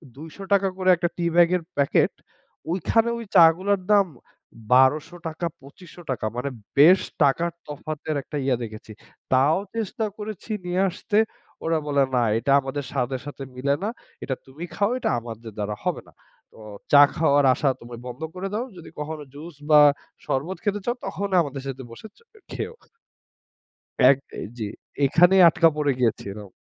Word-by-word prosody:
২০০ 155 +3 -11 0.2
টাকা 195 -1 +3
করে 185 -1 +1
একটা 175 0 -1
টি 175 - -1
ব্যাগের 175 +1 +4 0.2
প্যাকেট। 140 -1 +3 0.6
ওইখানে 225 +6 +1
ওই 230 - -7
চাগুলোর 185 +3 +5
দাম 205 -1 +6 0.7
১২০০ 130 +6 +4
টাকা, 160 +2 -4 0.2
২৫০০ 165 +6 -14
টাকা। 120 -4 -3
মানে 125 +3 -2 0.3
বেশ 170 +7 +8 0.2
টাকার 165 +5 +2 0.2
তফাতের 155 +1 -5
একটা 150 - -6
ইয়া 135 -2 +2
দেখেছি। 110 -1 -9 0.4
তাও 135 +5 +4 0.2
চেষ্টা 225 +1 -2
করেছি 215 0 -7
নিয়ে 180 +1 0
আসতে। 205 +3 -2 0.5
ওরা 165 0 +1
বলে 140 -1 +3
না 125 - +3
এটা 120 +5 -1
আমাদের 135 +2 -4
স্বাদের 130 -1 -2
সাথে 145 -1 -7
মিলে 140 +2 0
না। 210 - 0 0.3
এটা 130 - -2
তুমি 135 +5 -10
খাও। 200 +4 +1
এটা - - -1
আমাদের 115 -1 -9
দ্বারা 105 0 -3
হবে - - -1
না। - - -19 0.5
ও - - -12 0.3
চা 145 - +9
খাওয়ার 145 -3 +3
আশা 135 +2 +1
তো - - -14
ভাই 120 -1 -8
বন্ধ 125 +5 -8
করে 185 +2 -4
দাও। 225 +4 -1
যদি 170 - -11
কখনো 150 0 -5
জুস 155 +3 -10
বা 150 -1 +8 0.5
শরবত 160 +8 -2
খেতে 205 -1 0
চাও, 240 - 0
তখন 200 +1 -3
আমাদের 140 -3 -5
সাথে 135 -1 -6
বসে 115 - -10
চো - - -24 0.3
খেও। 465 - -4 1.4
এক 135 - +5 0.2
আ - - -5 0.2
জি। 110 -3 -3 0.4
এখানে 175 +7 +5
আটকা 165 +1 +4
পড়ে 145 -2 +1
গ্যাছে 115 -3 0
এরাও। 105 -1 -10
155 Hz, 165 wpm, -24 LUFS, 135-180 Hz, 1.4 s, চা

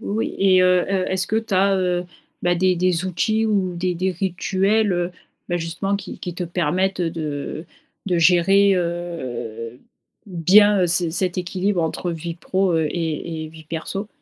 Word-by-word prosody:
oui. 215 +3 -2
Et 190 -1 +5
heu, 180 -1 +4
est 190 -1 0
est-ce 190 0 0
que 220 - -1
tu 225 -3 -1
as, 195 +1 +3
heu 180 -1 0 0.4
bah, 175 0 +2
des 185 +1 +3
des 180 0 +1
outils 215 +4 0
ou 190 -4 0
des 180 +1 -1
des 185 +2 0
rituels, 195 +3 0
heu, 175 0 -1 0.4
bah, 175 - 0
justement 170 +4 -2
qui 200 - -8
qui 180 -2 -6
te 180 - -4
permettent 180 +3 0
de 160 -2 -3 0.4
de 180 -3 +1
gérer, 190 +4 +5
heu, 125 -10 -4 0.5
bien 195 +2 +5
ce 170 -1 +2
cet 180 +1 -1
équilibre 185 0 -1
entre 170 +2 -2
vie 165 0 -5
pro 185 0 0
et 160 -2 0 0.5
et - - -7
vie 160 0 -14
perso? 180 +6 -5
180 Hz, 165 wpm, -21 LUFS, 170-195 Hz, 0.5 s, Et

